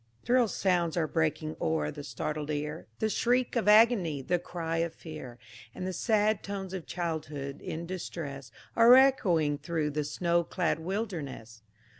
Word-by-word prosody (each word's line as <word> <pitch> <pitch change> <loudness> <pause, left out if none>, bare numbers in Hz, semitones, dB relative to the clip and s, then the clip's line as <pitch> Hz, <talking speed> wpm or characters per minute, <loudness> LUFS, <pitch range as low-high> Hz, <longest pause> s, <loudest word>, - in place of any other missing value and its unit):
"Thrill 245 0 +4
sounds 175 -5 0
are 165 - +2
breaking 155 0 -1
o'er 80 -2 0
the 145 - -8
startled 150 +2 -4
ear, 150 +1 -4
The 220 - 0
shriek 245 +4 +1
of 230 -3 0
agony, 210 - +5
the 175 +5 +1
cry 165 -1 -4
of 165 0 -1
fear; 155 -7 -9 0.4
And 185 - -5
the 185 - -3
sad 215 +1 +2
tones 195 -2 -5
of 185 -4 -6
childhood 155 -5 -4
in 165 +2 -5
distress, 155 -7 -6 0.2
Are 235 +2 +8
echoing 180 - +4
through 155 -1 -2
the 150 +1 -1
snow 170 +3 +1
clad 170 -1 -1
wilderness! 160 - -5
170 Hz, 155 wpm, -29 LUFS, 150-195 Hz, 0.4 s, Are